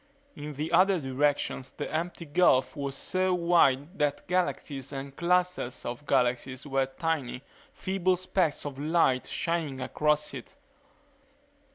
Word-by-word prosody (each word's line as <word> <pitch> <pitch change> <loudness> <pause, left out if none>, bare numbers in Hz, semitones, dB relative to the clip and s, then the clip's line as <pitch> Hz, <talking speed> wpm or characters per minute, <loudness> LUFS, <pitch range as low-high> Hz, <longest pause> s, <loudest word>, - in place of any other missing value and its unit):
In 150 0 -7
the 155 +4 -3
other 185 +2 +5
directions 135 -1 0
the - - -6
empty 170 +1 -3
gulf 145 -4 +3
was 140 -2 -3
so 185 +4 0
wide 170 -2 +2
that 145 -1 0
galaxies 150 -7 -1
and 135 0 -6
clusters 180 -7 0
of 120 +5 -6
galaxies 125 +2 +1
were 135 -2 +1
tiny, 135 -3 -3 0.3
feeble 185 -1 0
specks 180 -4 0
of 140 -2 -5
light 150 -4 +2
shining 165 -6 -2
across 150 +3 0
it. - - -9
150 Hz, 130 wpm, -28 LUFS, 135-175 Hz, 0.3 s, other